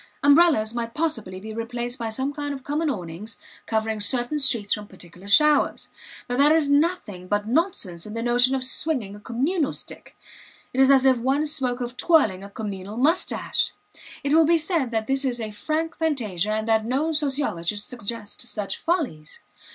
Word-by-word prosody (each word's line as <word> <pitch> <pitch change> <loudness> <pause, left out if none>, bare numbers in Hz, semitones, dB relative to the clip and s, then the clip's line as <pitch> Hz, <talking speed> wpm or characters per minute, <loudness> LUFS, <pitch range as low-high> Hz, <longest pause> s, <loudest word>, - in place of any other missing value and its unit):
Umbrellas 285 -7 +5
might 230 -1 -4
possibly 230 - -2
be 215 +3 -8
replaced 240 +2 -4
by 230 -1 -3
some 265 +6 -2
kind 290 -1 -4
of 265 - -10
common 300 +3 -1
awnings 190 -2 -5 0.3
covering 220 -1 -1
certain 245 +7 +1
streets 230 -7 +2
from 210 -1 -5
particular 180 0 -12
showers. 300 +8 +3 0.4
But 245 +1 -2
there 295 +3 +6
is 295 -3 +2
nothing 285 - 0
but 205 +2 -1
nonsense 225 - -1
in 210 - -8
the 230 - -3
notion 245 +2 +3
of 260 - 0
swinging 255 -6 +1
a - - -11
communal 275 - -1
stick; - - -9 0.6
it 260 - +2
is 265 - +6
as 270 -1 +5
if 260 -1 +5
one 270 +5 0
spoke 255 -4 -1
of 245 0 -5
twirling 220 - +3
a 200 - -9
communal 200 0 -6
mustache. 315 +8 +1 0.5
It 285 +1 0
will 320 -1 +5
be 335 +1 +5
said 320 -5 0
that 220 -2 -2
this 270 +3 +1
is 250 -3 0
a 220 -2 -4
frank 310 +10 -3
fantasia 220 - 0
and 215 +1 -2
that 220 -1 +3
no 270 +8 0
sociologists 245 - -1
suggest 230 -3 -4
such 215 -5 -3
follies. 280 - -2
245 Hz, 180 wpm, -24 LUFS, 215-290 Hz, 0.6 s, there